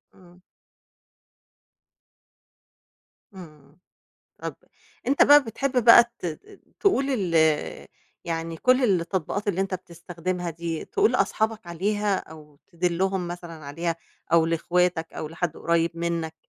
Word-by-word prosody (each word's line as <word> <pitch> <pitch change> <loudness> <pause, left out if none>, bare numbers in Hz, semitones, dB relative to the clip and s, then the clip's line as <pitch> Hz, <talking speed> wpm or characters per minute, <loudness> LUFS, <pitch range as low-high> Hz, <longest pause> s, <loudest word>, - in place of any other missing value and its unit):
إمم. 180 -1 -19 3.0
إمم. 190 - -9 0.3
إمم، - - -35 0.6
طَب - - -5 0.5
أنت 275 +3 +4
بقى 290 0 +7
بتحب 250 +2 -1
بقى 235 0 +9
ت - - -5 0.5
تقول 280 - +2
ال 195 -10 -1 0.9
يعني 165 -1 -3
كل 255 +8 +3 0.2
التطبيقات 190 +4 -3
اللي 190 -2 0
أنت 195 -1 -1
بتستخدمها 175 0 -5
دي 165 0 -5
تقول 420 +1 +1
لأصحابك 220 -2 0
عليها 200 +4 0
أو 150 -4 -11
تدلُّهم 180 +1 -1
مثلًا 175 -1 -7
عليها 165 +4 -3 0.4
أو 165 -1 +5
لإخواتك 170 0 0
أو 155 - -5
لحد 165 0 -3
قريّب 170 0 +1
منّك 170 -1 -2
175 Hz, 115 wpm, -25 LUFS, 165-205 Hz, 3.0 s, بقى